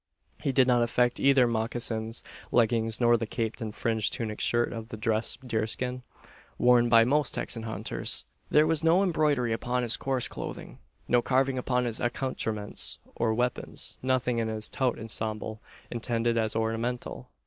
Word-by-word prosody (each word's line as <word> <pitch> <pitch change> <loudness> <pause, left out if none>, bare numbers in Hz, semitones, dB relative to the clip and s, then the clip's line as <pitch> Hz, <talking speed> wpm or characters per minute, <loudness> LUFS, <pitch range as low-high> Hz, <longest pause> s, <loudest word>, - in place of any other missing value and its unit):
He 140 - 0
did 130 -1 +4
not 120 -1 +4
affect 120 +1 +1
either 135 -2 +5
mocassins, 115 0 -2 0.3
leggings, 115 -1 +2
nor 120 -1 +4
the 115 -1 -4
caped 115 +2 -3
and 110 -1 -3
fringed 110 -2 0
tunic 110 -2 -3
shirt 120 0 +1
of 115 -1 -6
dressed 115 +3 -1
deerskin 120 +3 -2 0.6
worn 120 -1 +4
by 115 -1 +7
most 140 +3 +1
Texan 115 - -1
hunters. 110 0 -1 0.2
There 150 +1 +5
was 160 0 0
no 170 +4 +4
embroidery 150 - +1
upon 125 +2 -1
his 120 -1 +4
coarse 130 -2 +1
clothing, - - -7 0.3
no 120 0 +3
carving 130 +1 +1
upon 125 0 0
his 115 -2 -1
accoutrements 115 -4 -1 0.2
or 115 - +1
weapons, 125 +1 -2
nothing 125 -2 0
in 115 - 0
his 110 -1 -2
tout 130 -3 0
ensemble 110 -1 -4 0.3
intended 115 0 -1
as 110 -1 0
ornamental. 115 +3 -3
120 Hz, 155 wpm, -28 LUFS, 110-125 Hz, 0.6 s, by